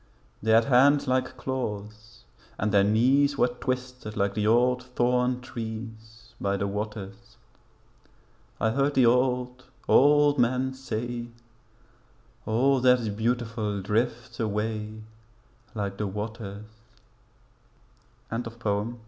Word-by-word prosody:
They 110 - -3
had 115 +1 +5
hands 140 +3 +4
like 130 0 0
claws, 110 -3 -5 0.3
and 105 +1 -1
their 100 -1 +5
knees 130 +7 +3
Were 125 - +3
twisted 125 -2 -5
like 100 0 +1
the 105 0 0
old 125 +2 +3
thorn 125 0 0
trees 110 0 -8
By 100 0 0
the 100 - -1
waters. 105 +2 -6 1.2
I 110 +1 +1
heard 140 +4 +1
the 130 - +5
old, 125 +1 +1 0.2
old 145 0 +5
men 130 +2 +1
say 120 -2 -4 1.2
'All 130 +5 +3
that's 125 -3 +3
beautiful 110 -1 -2
drifts 120 +4 -2
away 110 0 -3 0.7
Like 100 -2 -3
the 105 - -1
waters.' 105 0 -6 1.7
UNDER 115 +1 -3
THE 115 - -17
MOON. 105 +4 -1
115 Hz, 115 wpm, -26 LUFS, 105-125 Hz, 1.7 s, had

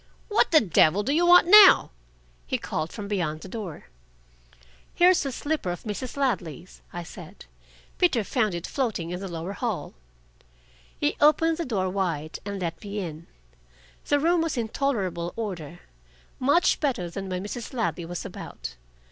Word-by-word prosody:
"What 425 - +3
the 320 - +6
devil 185 0 +3
do 275 - 0
you 345 +3 +3
want 355 0 +8
now?" 395 - +8 0.6
he - - 0
called 160 - -4
from 205 -2 -7
beyond 170 -7 -2
the - - -9
door. 190 -6 -7 1.1
"Here's 360 +1 +5
a - - -3
slipper 290 - -2
of 175 -1 -5
Mrs. 235 +5 -5
Ladley's," 185 - -3
I 175 - -6
said. - - -12 0.5
"Peter 275 -11 +3
found 215 -4 0
it 170 - -5
floating 220 -11 -2
in 180 - -4
the 195 - -5
lower 170 +2 -5
hall." 210 - -4 1.1
He 295 - 0
opened 315 +2 +4
the 335 - -1
door 200 -8 -1
wide, 170 -5 -3
and 200 -1 -4
let 170 0 -4
me 205 0 -6
in. 170 -4 -6 0.8
The 290 - +3
room 335 +3 +2
was 325 -4 -2
in 225 -2 -2
tolerable 190 -11 -2
order, 175 -7 -6 0.6
much 285 +7 +3
better 255 - -1
than 195 +1 -6
when 185 0 -3
Mrs. 225 +3 -6
Ladley 230 -9 -2
was 175 +1 -6
about. - - -8
205 Hz, 165 wpm, -26 LUFS, 175-280 Hz, 1.1 s, want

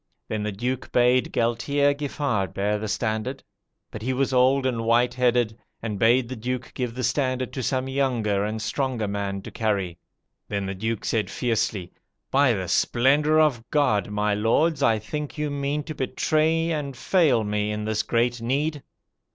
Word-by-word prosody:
Then 110 -1 -2
the 105 0 -2
Duke 125 +6 -3
bade 125 +1 +3
Galtier 120 +5 +1
Giffart 140 - -2
bear 105 +1 0
the 110 - -4
standard. 110 +4 -2 0.5
But 110 - -7
he 130 +4 -1
was 135 +1 0
old 130 +2 +4
and 120 -3 0
white 120 +2 +3
headed, 120 -3 +1 0.2
and 105 -3 -4
bade 120 +3 +4
the 130 - -5
Duke 125 +2 -4
give 125 -2 -3
the 130 - -3
standard 130 0 0
to 130 - -3
some 130 +1 -1
younger 120 -7 0
and 110 +1 -2
stronger 115 -1 -1
man 100 -1 -3
to - - -8
carry. 100 -6 -1 0.5
Then 100 -1 -2
the 95 - -3
Duke 110 +3 -3
said 110 -2 0
fiercely, 110 -6 -1 0.4
'By 135 -2 +4
the 95 -4 -3
splendour 145 - +3
of 140 -7 +3
God, 125 -10 +2
my 105 0 0
lords, 140 +9 +2
I 115 -5 +4
think 150 +9 -5
you 150 -1 -1
mean 140 +1 -2
to 155 - -6
betray 160 +4 +1
and 140 -5 -3
fail 130 - +3
me 105 0 -1
in 105 0 -3
this 110 -1 0
great 120 0 0
need.' 145 +5 -1
120 Hz, 175 wpm, -25 LUFS, 110-140 Hz, 0.5 s, old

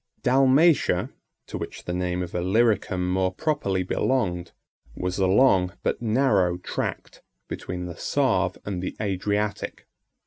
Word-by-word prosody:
Dalmatia, 135 +5 +4 0.3
to - - -6
which - - -7
the 90 - -4
name 90 0 -1
of 90 - -8
Illyricum 95 0 +1
more 95 0 +1
properly 100 -6 -1
belonged, 90 -4 -1 0.4
was 90 +1 -3
a 95 - +3
long, 95 -3 +4
but - - -1
narrow 110 -7 +2
tract, 90 - -5 0.3
between 90 0 -5
the 85 -1 -6
Save - - +1
and 95 -3 -3
the 95 - -4
Adriatic. 105 +1 -2
95 Hz, 130 wpm, -25 LUFS, 90-115 Hz, 0.4 s, Dalmatia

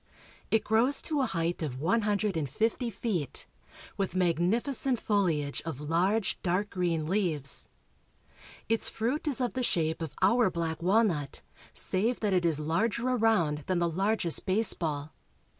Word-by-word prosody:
It 220 -1 +2
grows 230 +6 +3
to 300 -3 0
a 260 - +1
height 170 -3 -2
of 140 -5 -3
one 190 +10 +2
hundred 210 -2 0
and 150 -4 -2
fifty 225 - -1
feet, 195 - -3 0.5
with 195 -2 -2
magnificent 215 - +2
foHage 165 -9 0
of 160 -5 -6
large 180 +8 0
dark 185 +3 -1
green 170 -4 -1
leaves. 165 -6 0 1.0
Its 225 0 +1
fruit 255 +8 -2
is 280 -4 +1
of 245 -2 -1
the 260 - -2
shape 160 -8 0
of 160 -4 -5
our 230 +3 +4
black 165 -2 -3
walnut, 180 -7 +1 0.3
save 225 +6 0
that 210 -3 +1
it 180 -2 +2
is 160 -3 +1
larger 215 +11 0
around 220 -11 +2
than 185 - +1
the 170 0 +1
largest 190 +1 0
baseball. 165 -7 +1
185 Hz, 150 wpm, -29 LUFS, 165-225 Hz, 1.0 s, our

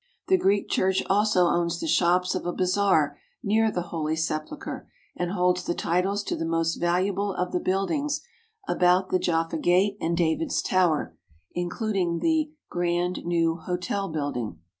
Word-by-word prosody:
The 380 - +5
Greek 200 - +2
Church 190 0 +1
also 205 -2 +3
owns 170 0 +1
the - - -3
shops 175 +3 +2
of - - -3
a - - 0
bazaar 185 -6 +2 0.2
near 220 +2 +3
the 180 -4 -2
Holy 155 -1 -1
Sepulchre 160 - -4 0.3
and 175 0 -2
holds 180 -1 +1
the 175 - -2
titles 190 +4 0
to - - -2
the - - -3
most 165 0 0
valuable 190 +3 0
of 180 0 -2
the 180 - 0
buildings 280 - -1 0.5
about 180 +1 +3
the 185 - +2
Jaffa 165 -1 0
Gate 190 +5 +2
and 170 +1 0
David's 165 -1 0
Tower, 160 - +1 0.4
including 175 0 -1
the 315 - +1 0.2
Grand 175 +1 -1
New 165 -1 +1
Hotel 180 +3 -3
building. 140 - -3
180 Hz, 155 wpm, -26 LUFS, 165-195 Hz, 0.5 s, The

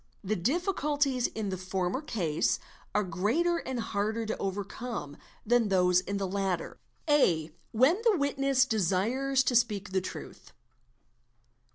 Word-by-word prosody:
The 210 +2 0
difficulties 285 - +1
in 215 -2 -4
the 185 -1 -4
former 185 +5 -2
case 180 - 0 0.4
are 210 - +3
greater 220 - +1
and 260 -6 -4
harder 220 +1 -1
to 220 - -3
overcome 200 - -4 0.3
than 235 0 +3
those 180 -2 +4
in 200 +2 -3
the 200 - -1
latter. 190 -2 -2 0.3
A. 170 - +3 0.2
When 270 - +3
the 450 -5 +4
witness 275 -2 +2
desires 230 +6 +1
to 250 - 0
speak 210 -4 +1
the 190 0 +1
truth. 185 - -9
220 Hz, 135 wpm, -29 LUFS, 190-270 Hz, 0.4 s, those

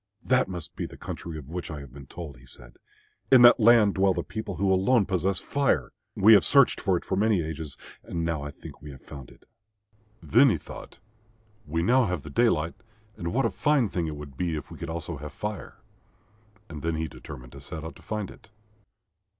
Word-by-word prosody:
"That 130 0 +3
must 90 -4 -7
be - - -3
the - - -13
country 85 -2 -6
of 70 -4 -9
which 90 0 -5
I 75 -2 -5
have 70 -3 -12
been 70 -1 -11
told," 80 -6 -8
he 65 +2 -18
said. - - -12 0.5
"In 130 -2 +8
that 120 +1 +8
land 110 -3 +6
dwell 95 -1 +2
the - - -2
people 110 -3 -5
who 95 +3 +2
alone 100 +4 +3
possess 95 0 0
Fire. 140 -1 0 0.2
We 110 +3 +7
have 100 - +7
searched 140 -3 +4
for 95 -3 +2
it - - -7
for 95 - -1
many 105 -3 +2
ages 80 -2 -6 0.2
and 85 -1 -4
now 85 -3 -1
I 70 - -5
think - - -12
we 75 - -9
have 65 -2 -12
found 65 -4 -10
it." - - -20 0.8
Then 75 - +5
he - - +1
thought, - - -11 0.7
"We 80 +2 -1
now 125 +4 +4
have 90 -5 -3
the 75 - -9
daylight, 85 - +2 0.4
and 85 -1 -4
what 135 +4 +1
a - - +1
fine 145 -7 +2
thing 85 -3 -2
it 75 - -4
would 75 -2 -10
be 85 0 -1
if 75 - -7
we - - -10
could - - -5
also 80 -1 -5
have 75 +1 -8
Fire," 105 +4 -6 0.9
and 75 -3 -9
he 80 0 -2
determined 60 -4 -11
to 70 - -11
set 80 +2 -7
out 80 - -7
to - - -17
find 105 -3 -4
it. - - -17
85 Hz, 215 wpm, -27 LUFS, 75-105 Hz, 0.9 s, In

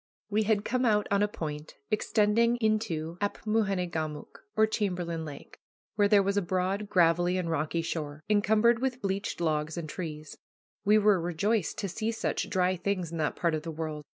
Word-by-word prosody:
We 215 +1 +2
had 210 -1 +1
come 255 +1 0
out 210 -3 +3
on 200 0 +3
a 210 - +3
point 150 -6 -6 0.2
extending 215 +2 +3
into 215 -8 -1
Apmoojenegamook, 185 -8 -2 0.2
or 220 - +6
Chamberlain 180 -6 -2
Lake, 145 -2 -10 0.3
where 205 -1 +3
there 200 -1 +5
was 200 +1 0
a - - +4
broad, 190 +3 -1
gravelly, 175 -1 +3
and 170 -3 -2
rocky 160 +2 -1
shore, 155 -2 -4
encumbered 215 +2 +3
with 255 0 -1
bleached 195 0 -2
logs 155 -1 -1
and 165 -2 -4
trees. 155 -2 -7 0.4
We 210 +1 +5
were 205 -4 +4
rejoiced 180 +4 0
to 200 - -2
see 220 +4 -2
such 225 - -2
dry 185 -1 +1
things 180 -2 -2
in 165 - -4
that 155 - 0
part 170 -2 0
of 155 - -1
the 165 - -6
world. 155 -1 -4
185 Hz, 180 wpm, -29 LUFS, 165-210 Hz, 0.4 s, or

